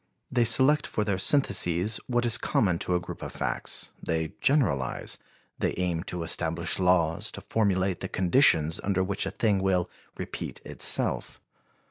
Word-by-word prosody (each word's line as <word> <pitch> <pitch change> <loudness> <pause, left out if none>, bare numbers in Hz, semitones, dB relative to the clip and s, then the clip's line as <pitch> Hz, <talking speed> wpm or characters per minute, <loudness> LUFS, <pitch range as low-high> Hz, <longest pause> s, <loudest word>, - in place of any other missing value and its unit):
They 120 -2 +2
select 130 +6 +4
for 105 - -1
their 100 -3 -1
syntheses 100 - +2
what 120 -1 0
is 120 0 +4
common 90 -6 +1
to 90 - -1
a - - +2
group 90 - -9
of - - -6
facts; - - -2
they 80 -1 -2
generalize, 105 - 0 0.4
they - - -1
aim 90 -3 -1
to 90 -1 -4
establish 85 +1 -1
laws, 90 +3 +1
to 100 - -7
formulate 95 -3 0
the 95 - -5
conditions 85 - +3
under 95 -2 +1
which 95 +1 -1
a - - -1
thing 105 -4 +1
will 95 -2 0 0.3
repeat - - -6
itself. - - 0
95 Hz, 155 wpm, -27 LUFS, 85-110 Hz, 0.4 s, select